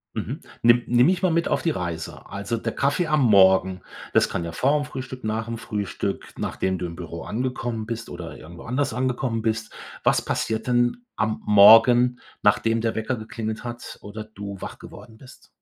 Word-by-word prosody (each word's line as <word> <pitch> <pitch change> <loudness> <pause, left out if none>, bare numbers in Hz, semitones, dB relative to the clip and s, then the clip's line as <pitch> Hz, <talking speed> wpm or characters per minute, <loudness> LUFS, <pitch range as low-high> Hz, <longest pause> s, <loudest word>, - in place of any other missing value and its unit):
Mhm. - - -4 0.2
Nimm 120 +1 +5
nimm 120 +2 +4
mich 185 +1 +1
mal 185 - +3
mit 170 +1 +1
auf - - 0
die 165 - +2
Reise. 85 - -5
Also 100 +4 -3
der 115 0 -3
Kaffee 145 +5 +1
am 150 -2 +2
Morgen, 95 -4 +5 0.3
das - - +4
kann 85 - -3
ja 85 - -5
vorm 145 - +1
Frühstück, 130 -2 -7
nach 110 +1 -2
'm 115 0 -4
Frühstück, 100 -3 -4
nachdem 95 -1 -2
du 90 - -4
im 85 -1 -6
Büro 85 -1 -7
angekommen 120 -2 -3
bist 115 0 -5
oder 85 -1 -7
irgendwo 85 +2 -12
anders 130 +2 -1
angekommen 125 -2 -1
bist 110 0 -2 0.3
was - - +3
passiert 110 +2 -2
denn 120 0 +2 0.2
am 110 0 -1
Morgen, 115 +4 +7 0.2
nachdem 115 +3 +3
der 115 -1 0
Wecker 110 +4 -1
geklingelt 110 0 -5
hat 120 0 -7
oder 105 +1 -7
du 100 -2 -8
wach - - -7
geworden 110 -2 -13
bist? 130 +1 -16
115 Hz, 185 wpm, -24 LUFS, 100-125 Hz, 0.3 s, Morgen